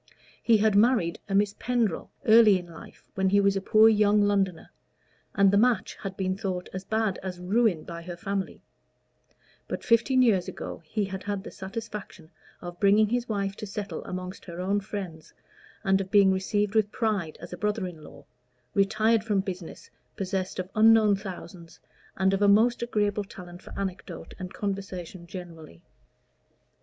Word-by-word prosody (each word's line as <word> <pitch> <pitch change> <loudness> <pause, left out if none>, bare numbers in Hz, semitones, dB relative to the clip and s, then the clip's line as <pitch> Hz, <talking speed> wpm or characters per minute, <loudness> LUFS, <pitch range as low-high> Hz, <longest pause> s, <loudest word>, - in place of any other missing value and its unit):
He 230 -2 +4
had 215 -1 +2
married 210 -6 +3
a 195 - 0
Miss 200 0 +2
Pendrell 235 -8 -1 0.2
early 220 -3 +7
in 180 - -7
life, 170 -1 -14
when 190 0 +1
he 200 +1 +4
was 200 0 +3
a 195 - -1
poor 215 +3 +5
young 210 -1 +4
Londoner, 195 -4 0 0.6
and 200 -2 +5
the 200 - +4
match 245 +1 +2
had 195 -1 -6
been 185 -1 -1
thought 190 -3 -4
as 190 0 -5
bad 220 -1 -1
as 185 -2 -5
ruin 190 -2 +1
by 170 -1 -8
her 175 0 -8
family; 195 +1 -4 1.0
but - - -5
fifteen 250 +2 +3
years 200 -7 +2
ago - - -7
he 210 +5 -1
had 190 -1 -6
had 205 -1 -4
the - - -9
satisfaction 195 -4 -8 0.3
of 175 0 -8
bringing 205 +1 +4
his 245 +1 -1
wife 200 -2 -2
to 215 - -6
settle 205 +1 -5
amongst 185 +1 -6
her 170 -1 -8
own 195 +3 0
friends, 190 -6 -7 0.5
and 195 -1 +3
of 190 - -6
being 200 -1 +5
received 205 +2 -1
with 215 -2 +2
pride 205 -9 -1
as 175 +2 -9
a - - -6
brother 210 0 -1
in 165 -4 -8
law, - - -14 0.5
retired 215 +3 +2
from 210 -3 +1
business, 185 -3 -8 0.2
possessed 190 -1 -3
of 185 -1 -3
unknown 220 -1 +5
thousands, 180 -3 -9 0.4
and 190 +1 +2
of 195 - 0
a 205 - +5
most 225 +4 +4
agreeable 210 -3 0
talent 180 -2 -11
for - - -13
anecdote 185 -3 -6
and 185 -1 -6
conversation 190 -3 -5
generally. 165 - -10
195 Hz, 170 wpm, -27 LUFS, 185-210 Hz, 1.0 s, early